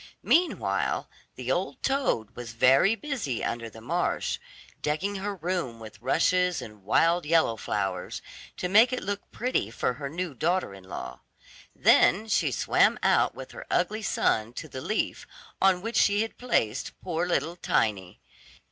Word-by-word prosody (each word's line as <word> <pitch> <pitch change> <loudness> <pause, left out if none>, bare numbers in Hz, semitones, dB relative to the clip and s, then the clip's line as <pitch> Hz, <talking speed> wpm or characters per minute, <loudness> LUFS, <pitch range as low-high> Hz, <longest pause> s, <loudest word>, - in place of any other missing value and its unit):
Meanwhile 345 +1 +1 0.3
the - - -3
old - - -2
toad 265 - 0
was 120 -2 -7
very 135 - +5
busy 230 - -3
under 115 -1 -3
the 110 0 -13
marsh, - - -1 0.4
decking 185 +7 -1
her 200 +1 -3
room 170 -9 -3
with 110 -1 -11
rushes 180 +1 +2
and 105 -3 -10
wild 165 - +3
yellow 160 -6 +3
flowers, 95 -4 -3 0.4
to 180 - -2
make 220 +6 +6
it 255 - -2
look 200 +1 -4
pretty 245 - -1
for 115 +2 -1
her 140 - -3
new 170 +1 -4
daughter 175 - 0
in 95 -1 -13
law. 65 -8 -7 0.6
Then 215 +4 +4
she - - +2
swam - - +3
out - - +3
with - - -9
her - - -10
ugly 215 +1 0
son 115 - 0
to - - -7
the 130 - -7
leaf 215 - -2 0.3
on 190 -1 +4
which 230 0 -2
she 205 +1 +4
had 225 - -8
placed 130 - -1
poor 175 -1 -1
little 170 -1 0
Tiny. 100 - -1
165 Hz, 155 wpm, -27 LUFS, -, 0.6 s, make